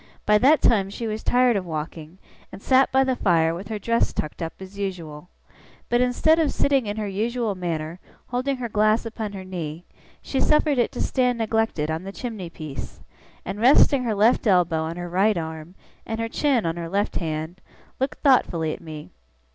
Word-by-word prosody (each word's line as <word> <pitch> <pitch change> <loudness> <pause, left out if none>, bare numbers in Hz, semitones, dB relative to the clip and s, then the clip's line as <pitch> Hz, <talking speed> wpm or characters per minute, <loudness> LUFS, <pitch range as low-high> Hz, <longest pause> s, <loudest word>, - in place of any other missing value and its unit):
By 210 0 +4
that 290 +6 +4
time 195 -4 +3
she 230 +4 -5
was 215 0 -3
tired 245 -1 +3
of 195 - 0
walking, 160 0 -6 0.3
and - - -9
sat 265 +5 +3
by 265 0 +4
the 260 -1 0
fire 165 -6 +2
with 185 +4 -7
her 215 - -3
dress 230 +3 +1
tucked 155 +3 -4
up 165 0 -3
as 190 +1 -10
usual. 175 -4 -5 0.6
But 240 0 +3
instead 280 +6 +3
of 310 -3 +2
sitting 275 -5 +1
in 205 +1 -3
her 215 -1 -2
usual 225 +3 -1
manner, 170 -2 -4 0.3
holding 255 +2 -1
her 245 -1 -3
glass 215 +1 +2
upon 220 -2 -5
her 190 -1 -7
knee, 170 -2 -6 0.4
she 270 - -2
suffered 300 -3 +3
it 240 - +2
to - - -4
stand 250 -2 +1
neglected 225 -9 0
on 160 +1 -2
the 195 +1 -7
chimney 210 -6 -6
piece; 155 -4 -8 0.4
and, 205 - -5
resting 260 +2 +5
her 225 -3 -1
left 225 +3 +3
elbow 175 -4 +3
on 160 +1 -3
her 175 0 -5
right 195 +3 +2
arm, 160 +1 -6 0.3
and 225 0 -5
her 230 - -1
chin 265 - +1
on 165 0 -1
her 170 -1 -5
left 200 +3 -1
hand, 160 +2 -4 0.4
looked 265 +2 -2
thoughtfully 170 - +3
at - - -9
me. 155 -2 -9
205 Hz, 195 wpm, -24 LUFS, 170-240 Hz, 0.6 s, resting